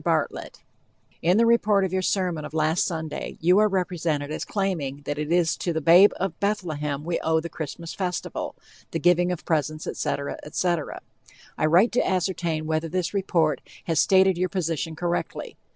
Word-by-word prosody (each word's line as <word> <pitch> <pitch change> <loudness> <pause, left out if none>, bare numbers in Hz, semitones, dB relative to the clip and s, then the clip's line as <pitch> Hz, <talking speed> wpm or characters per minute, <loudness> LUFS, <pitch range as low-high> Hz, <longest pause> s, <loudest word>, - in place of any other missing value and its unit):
BARTLETT: - - -2 0.6
In 175 +4 +3
the 230 - +5
report 215 -4 +3
of 185 - -4
your 190 - +1
sermon 180 -4 0
of 150 +1 -8
last 160 +2 +2
Sunday 160 -3 -5
you 180 +4 +4
are 215 - +5
represented 170 -6 -1
as - - -3
claiming 160 -9 -2
that 145 0 -3
it 150 +1 -3
is 170 -2 +3
to 175 - -2
the 160 - 0
"babe 175 +6 +7
in 190 -3 -1
Bethlehem" 155 -8 -2
we 170 +1 -1
owe 160 0 +1
the 170 +1 -5
Christmas 165 +2 -6
festival, 180 -3 -3 0.3
the 165 - -3
giving 175 +2 +3
of 180 - -5
presents, 155 -1 -1
etc., 140 0 -3
etc. 165 0 -2 0.5
I 155 - +1
write 180 +9 +5
to 245 - +2
ascertain 175 -4 -1
whether 160 +1 -1
this 180 +2 -2
report 170 -6 +1 0.2
has 165 -2 0
stated 190 -2 +4
your 185 0 +1
position 165 -3 -2
correctly? 175 +1 -3
170 Hz, 175 wpm, -25 LUFS, 155-185 Hz, 0.6 s, babe